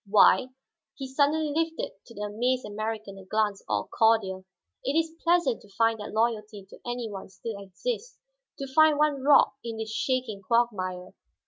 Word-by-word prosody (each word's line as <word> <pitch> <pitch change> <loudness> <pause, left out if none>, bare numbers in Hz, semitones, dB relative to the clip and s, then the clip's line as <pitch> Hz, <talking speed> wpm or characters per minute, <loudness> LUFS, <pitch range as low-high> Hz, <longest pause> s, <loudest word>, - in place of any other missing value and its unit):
Why," 215 +5 +6 0.5
he 270 - -6
suddenly 290 +3 +1
lifted 325 +1 -1 0.2
to 230 - -13
the 205 - -7
amazed 245 +5 0
American 215 -1 -5
a - - -11
glance 205 0 0
all 105 -1 0
cordial, 200 -4 +2 0.4
"it 275 +4 0
is 325 0 +1
pleasant 340 -8 +2
to 205 - -18
find 225 -1 +3
that 210 - -6
loyalty 215 -2 -1
to - - -12
any 240 -1 -3
one 195 -3 -8
still 200 +2 -7
exists, 470 - -5 0.4
to 275 - -4
find 315 0 +6
one 295 -2 +2
rock 280 +1 +5
in 230 -1 -5
this 220 0 -4
shaking 250 -6 -1
quagmire. 185 -5 0
230 Hz, 165 wpm, -27 LUFS, 205-275 Hz, 0.5 s, Why